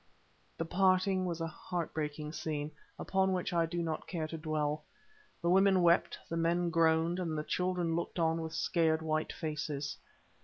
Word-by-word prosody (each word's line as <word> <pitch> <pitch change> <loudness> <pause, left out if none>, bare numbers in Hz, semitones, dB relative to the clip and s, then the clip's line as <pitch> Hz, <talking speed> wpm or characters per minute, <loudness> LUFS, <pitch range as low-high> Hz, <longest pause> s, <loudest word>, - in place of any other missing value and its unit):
The 165 - -2
parting 185 +1 +3
was 170 -1 -3
a - - 0
heart 170 +1 -4
breaking 150 -1 -3
scene, 150 -2 -3 0.3
upon 190 0 +1
which 180 -1 -1
I 165 -1 +2
do 170 +1 -2
not 160 -2 -3
care 165 -4 -2
to 165 - -5
dwell. 155 -1 -1 0.6
The 170 - +2
women 190 -1 +5
wept, 170 0 +4
the 165 - -3
men 170 +1 +1
groaned, 165 +1 +3
and 165 -4 -2
the 150 - -1
children 180 -1 0
looked 170 - -3
on 165 -1 +2
with 160 0 -5
scared 160 -1 +1
white 155 0 0
faces. 150 -3 -3
165 Hz, 170 wpm, -33 LUFS, 155-175 Hz, 0.6 s, women